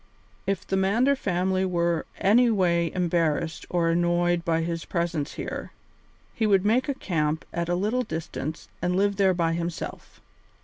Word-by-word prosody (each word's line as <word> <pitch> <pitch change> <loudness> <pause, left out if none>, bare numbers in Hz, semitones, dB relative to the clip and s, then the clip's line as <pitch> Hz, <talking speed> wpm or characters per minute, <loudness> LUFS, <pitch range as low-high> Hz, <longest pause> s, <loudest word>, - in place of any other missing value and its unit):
If 195 -2 -1
the 190 - -1
Mander 225 +9 +3
family 185 -4 0
were 170 -3 0
anyway 195 -6 +3
embarrassed 165 -3 0
or 170 -2 +1
annoyed 175 0 +2
by 165 -1 +1
his 165 0 -3
presence 170 -4 -2
here, - - -5 0.6
he 220 - 0
would 195 -2 +3
make 245 +7 +2
a 280 - 0
camp 160 - -1
at 170 0 -2
a 175 - +2
little 215 +7 0
distance 160 - -5
and 180 +1 0
live 200 +1 +2
there 190 -2 +3
by 165 -1 +1
himself. 170 0 -5
175 Hz, 150 wpm, -26 LUFS, 170-195 Hz, 0.6 s, Mander